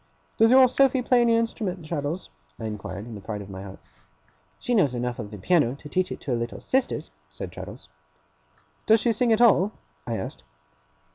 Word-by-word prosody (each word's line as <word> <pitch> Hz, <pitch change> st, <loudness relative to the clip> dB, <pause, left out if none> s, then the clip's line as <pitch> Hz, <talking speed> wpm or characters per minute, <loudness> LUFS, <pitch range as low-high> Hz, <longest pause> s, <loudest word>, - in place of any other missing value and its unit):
'Does 225 Hz, -, +6 dB
your 260 Hz, +1 st, +8 dB
Sophy 265 Hz, 0 st, +3 dB
play 245 Hz, 0 st, +4 dB
on 240 Hz, -1 st, +4 dB
any 230 Hz, -, +4 dB
instrument, 205 Hz, -6 st, -2 dB
Traddles?' 155 Hz, +2 st, -3 dB, 0.3 s
I -, -, -5 dB
inquired, 105 Hz, -2 st, -5 dB
in 120 Hz, -, -9 dB
the 105 Hz, -, -8 dB
pride 105 Hz, +1 st, -5 dB
of 100 Hz, -, -11 dB
my 95 Hz, 0 st, -7 dB
heart. 95 Hz, -1 st, -9 dB, 0.8 s
'She 245 Hz, -, -2 dB
knows 145 Hz, -, +3 dB
enough 120 Hz, 0 st, -3 dB
of 105 Hz, -3 st, -5 dB
the 105 Hz, -, -8 dB
piano 140 Hz, -, +2 dB
to 145 Hz, -, -12 dB
teach 185 Hz, +3 st, 0 dB
it -, -, -5 dB
to 135 Hz, -, -4 dB
her 120 Hz, -, +1 dB
little 115 Hz, 0 st, -4 dB
sisters,' 255 Hz, -, -1 dB, 0.2 s
said 75 Hz, -, -7 dB
Traddles. -, -, -9 dB, 1.0 s
'Does 220 Hz, +1 st, +6 dB
she 235 Hz, -, +2 dB
sing 230 Hz, +2 st, +1 dB
at 220 Hz, +1 st, +3 dB
all?' 210 Hz, -3 st, +5 dB, 0.3 s
I -, -, -1 dB
asked. -, -, -6 dB
170 Hz, 205 wpm, -25 LUFS, -, 1.0 s, your